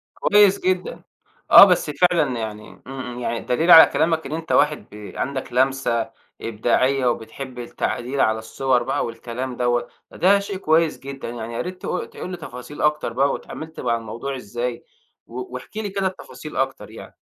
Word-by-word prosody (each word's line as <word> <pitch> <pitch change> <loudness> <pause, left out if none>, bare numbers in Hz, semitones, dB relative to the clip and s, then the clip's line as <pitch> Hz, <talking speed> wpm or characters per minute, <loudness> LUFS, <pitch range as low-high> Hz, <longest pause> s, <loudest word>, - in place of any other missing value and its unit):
كويّس 205 -1 +4
جدًا 185 0 -2 0.5
آه - - +12
بس 180 -5 +2
فعلًا 150 -4 +2
يعني 105 -1 -6 0.2
إمم، 135 0 -7
إمم 125 -1 -7
يعني 120 -1 -2
دليل 160 +8 +1
على 160 - +11
كلامك 160 +2 0
إن 140 - -6
أنت 160 +1 -4
واحد 150 0 +2
بي 105 0 -10
عندك 135 -2 -4
لمسة 130 -3 +1 0.3
إبداعية، 125 +4 +1
وبتحب 125 +2 -4
التعديل 125 +2 -3
على 110 0 +2
الصور 125 +2 0
بقى - - -1
والكلام 120 +2 -6
دوّة. 120 -1 0 0.2
ده - - -12
ده 200 +3 +5
شيء 200 -1 -5
كويّس 160 -2 +2
جدًا 135 -2 -7
يعني، 115 -1 -6
يا 115 - -2
ريت 180 +1 -7
ت - - -7
تقول 180 0 -5
لي 180 - -5
تفاصيل 145 -1 -9
أكتر 150 -5 +1
بقى 135 +3 +2
واتعاملت 160 +1 -7
مع 115 - 0
الموضوع 115 +5 -6
إزاي؟ 120 +1 -4 0.4
و 125 +1 -7
واحكِ 125 +11 -8
لي 215 -2 -3
كده 195 0 -1
التفاصيل 150 -6 -9
أكتر 135 0 -2
يعني. - - -12
135 Hz, 175 wpm, -22 LUFS, 120-160 Hz, 0.5 s, آه